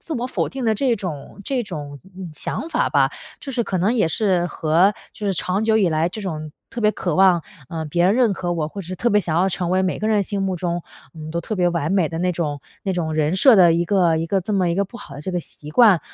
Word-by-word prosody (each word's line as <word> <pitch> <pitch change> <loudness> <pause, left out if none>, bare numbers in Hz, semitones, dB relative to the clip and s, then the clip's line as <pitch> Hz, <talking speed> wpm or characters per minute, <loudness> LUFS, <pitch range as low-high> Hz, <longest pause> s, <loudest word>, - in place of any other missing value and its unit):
自 320 - -7
我 245 -2 -2
否 255 - -1
定 265 -2 -5
的 220 -1 +3
这 245 0 +1
种 175 -2 -7
这 260 -3 -1
种 145 -8 -7 0.3
想 310 - -4
法 - - +1
吧。 - - +3 0.3
就 275 - -6
是 240 -1 0
可 190 -3 -2
能 205 +8 +2
也 210 -9 +2
是 180 -2 +1
和 170 +4 +2 0.2
就 210 - -5
是 195 - +2
长 185 +4 -1
久 220 0 +3
以 200 -5 +3
来 160 +1 +1
这 215 - -7
种 155 -5 -5 0.2
特 240 - -5
别 210 -1 +4
渴 175 -6 -2
望， 185 -2 +5 0.3
呃， 160 -1 -4
别 175 +4 +1
人 190 +3 +4
认 240 -4 +3
可 175 -1 -2
我， 155 -3 -2
或 200 - -7
者 185 0 -6
特 240 +5 0
别 210 0 +4
想 165 -3 -2
要 185 +2 +3
成 175 -1 -2
为 185 +1 +2
每 185 - -1
个 215 - -2
人 210 -2 +3
心 200 +1 -3
目 190 -1 0
中， 175 -1 -2 0.3
嗯， 155 -1 -8
都 170 - -1
特 210 +5 -4
别 175 -1 +3
完 170 -3 -1
美 185 -5 +2
的 165 - -6
那 180 +1 +1
种 150 -5 -3 0.2
那 195 - 0
种 165 -3 -2
人 155 +2 +1
设 230 +3 +6
的 175 -3 +7
一 170 +1 +1
个 175 -4 +3
一 165 - -1
个 195 +3 +1
这 200 +4 -4
么 185 -4 +2
一 - - 0
个 200 - +2
不 235 +5 -11
好 140 -11 -10
的 145 - -7
这 185 +4 -4
个 175 - -1
习 150 -2 -11
惯。 210 -7 +6
185 Hz, 300 characters per minute, -21 LUFS, 165-210 Hz, 0.3 s, 的